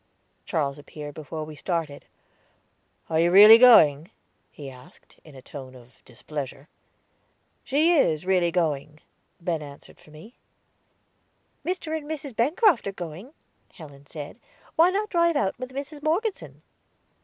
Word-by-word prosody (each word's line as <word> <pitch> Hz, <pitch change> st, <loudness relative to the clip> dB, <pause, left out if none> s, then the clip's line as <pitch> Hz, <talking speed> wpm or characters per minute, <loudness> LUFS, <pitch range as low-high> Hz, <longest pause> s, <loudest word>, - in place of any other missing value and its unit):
Charles 145 Hz, -4 st, -2 dB
appeared 145 Hz, 0 st, -10 dB
before 155 Hz, +1 st, -7 dB
we 155 Hz, 0 st, -10 dB
started. 160 Hz, -3 st, -4 dB, 1.0 s
"Are 160 Hz, -, 0 dB
you 170 Hz, +1 st, +3 dB
really 210 Hz, +5 st, +9 dB
going?" 160 Hz, -, +6 dB, 0.4 s
he 145 Hz, -, -11 dB
asked, 135 Hz, +6 st, -16 dB
in 155 Hz, -3 st, -16 dB
a 130 Hz, -, -13 dB
tone 130 Hz, -3 st, -10 dB
of 125 Hz, 0 st, -19 dB
displeasure. 140 Hz, +3 st, -8 dB, 1.0 s
"She 310 Hz, +6 st, +2 dB
is 165 Hz, -, +1 dB
really 185 Hz, -2 st, +2 dB
going," 155 Hz, -3 st, -2 dB, 0.4 s
Ben 170 Hz, -2 st, -3 dB
answered 145 Hz, -1 st, -13 dB
for -, -, -20 dB
me. 155 Hz, +10 st, -14 dB, 1.3 s
"Mr. 340 Hz, -3 st, -3 dB
and 305 Hz, -1 st, -7 dB
Mrs. 285 Hz, -5 st, -6 dB
Bancroft 310 Hz, -, +2 dB
are -, -, -2 dB
going," 180 Hz, -, -9 dB, 0.4 s
Helen 145 Hz, -4 st, -14 dB
said. 150 Hz, -, -9 dB, 0.4 s
"Why 335 Hz, +2 st, +5 dB
not 410 Hz, +3 st, -2 dB
drive 340 Hz, -2 st, +2 dB
out 200 Hz, -4 st, -1 dB
with 255 Hz, 0 st, -7 dB
Mrs. 285 Hz, +2 st, -7 dB
Morgeson?" 370 Hz, +8 st, -3 dB
170 Hz, 135 wpm, -25 LUFS, -, 1.3 s, really